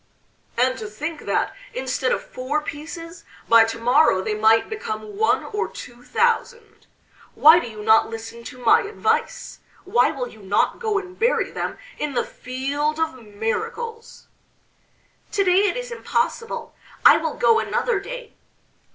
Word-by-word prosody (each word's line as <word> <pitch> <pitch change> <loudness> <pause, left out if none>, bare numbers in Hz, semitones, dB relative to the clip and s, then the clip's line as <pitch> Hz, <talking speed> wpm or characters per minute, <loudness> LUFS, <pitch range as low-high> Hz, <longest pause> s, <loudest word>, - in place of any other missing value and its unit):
"And 255 +1 +2
to 215 - -5
think 295 +9 -6
that, - - 0 0.2
instead 260 0 -1
of - - -1
four 260 +4 -3
pieces, 330 +4 -8 0.2
by 230 -1 +7
to 225 0 -4
morrow 240 -4 +3
they 215 - -1
might 220 +1 +4
become 435 -1 -6
one 440 +2 +2
or 420 0 -3
two 240 0 -11
thousand! 470 - -1 0.5
Why 320 +3 +8
do 290 - -5
you 215 -1 -9
not 220 +1 +5
listen 225 +1 -8
to - - -9
my 250 - +4
advice? 485 +4 -2 0.3
why 395 +6 +3
will 265 -5 -4
you 220 - -14
not 200 +1 +1
go 435 -3 0
and 370 -2 -6
bury 475 +2 +1
them - - -4 0.2
in 295 -3 -3
the - - +1
Field 285 +4 -3
of 320 0 0
Miracles?" 450 - -5 1.1
"To 405 -1 +2
day 385 +2 +4
it - - -3
is - - -5
impossible, 465 0 -2 0.3
I - - +9
will - - -3
go 450 -1 +4
another 480 -2 0
day." - - -8
310 Hz, 155 wpm, -22 LUFS, -, 1.1 s, I